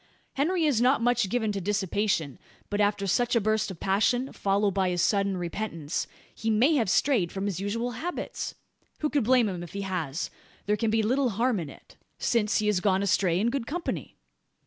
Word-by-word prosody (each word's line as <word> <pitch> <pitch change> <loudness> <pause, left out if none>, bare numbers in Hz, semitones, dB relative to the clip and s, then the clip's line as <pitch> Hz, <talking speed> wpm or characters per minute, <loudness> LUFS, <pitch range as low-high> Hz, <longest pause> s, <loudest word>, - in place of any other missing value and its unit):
Henry 330 +4 +1
is 270 -7 +2
not 255 +2 +4
much 245 -4 +2
given 220 -1 0
to 200 -1 -3
dissipation; 190 -6 -1 0.3
but 205 0 +1
after 205 -1 +1
such 240 +6 +1
a - - +5
burst 215 0 0
of 185 -4 -8
passion, 245 +7 +1
followed 200 +1 +1
by 190 -1 +1
his 175 -1 -1
sudden 200 -2 +1
repentance, 170 -3 -3 0.3
he 225 - -3
may 235 +8 +4
have 235 -10 +2
strayed 215 -7 +2
from 195 0 -3
his 195 -3 -2
usual 230 +5 -2
habits? 335 +10 -4 0.5
Who 300 - 0
could 285 -4 +2
blame 245 0 +4
him 180 -3 -4
if 175 - -9
he 200 - -3
has? 180 -6 -3 0.3
There 210 - +2
can 225 +1 0
be 220 0 +2
little 255 +4 +2
harm 230 +1 +1
in 160 -4 -5
it: - - -16 0.2
since 225 -3 +1
he 215 - 0
has 210 -3 +2
gone 190 0 +2
astray 185 -3 +2
in 230 +4 +1
good 265 -3 -3
company?" 345 +3 -4
210 Hz, 200 wpm, -27 LUFS, 190-245 Hz, 0.5 s, a